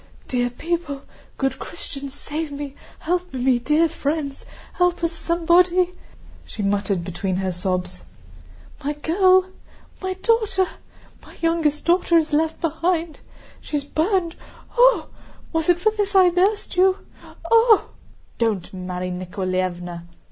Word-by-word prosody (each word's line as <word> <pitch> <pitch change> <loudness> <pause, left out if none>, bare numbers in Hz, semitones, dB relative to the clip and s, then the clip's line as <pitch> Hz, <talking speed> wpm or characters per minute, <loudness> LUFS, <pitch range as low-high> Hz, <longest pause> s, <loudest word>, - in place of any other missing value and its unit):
"Dear 245 -1 0
people, 290 +1 -3 0.3
good 270 -1 -1
Christians, 275 -1 -6
save 300 +1 -5
me, 285 -1 -6 0.3
help 360 +2 -1
me, 250 -1 +2
dear 300 +7 +3
friends... 290 -2 -3 0.3
help 355 -1 +1
us, 335 - +2
somebody," 345 +2 +3 0.5
she 210 - -6
muttered 200 -2 0
between 185 +2 -3
her 190 0 -1
sobs. 180 0 -2 0.8
"My 290 +2 -1
girl... 370 +5 +4 0.6
My 375 -1 -2
daughter! 430 -2 +2 0.6
My - - -15
youngest 330 -3 +1
daughter 345 0 +4
is 320 -2 +1
left 315 +1 +1
behind. 330 0 -1 0.4
She's 295 -2 -3
burned! 335 +3 0 0.4
Ooh! - - +5 0.5
Was 325 +1 0
it 350 -1 +4
for 435 +4 +3
this 410 -2 -2
I 370 -2 +7
nursed 380 +2 0
you.... 375 +1 +5 0.6
Ooh!" 455 -1 +6 0.6
"Don't, 215 -7 0
Mary 180 0 -4
Nikoláevna!" 180 -1 -3
320 Hz, 125 wpm, -22 LUFS, 235-360 Hz, 0.8 s, I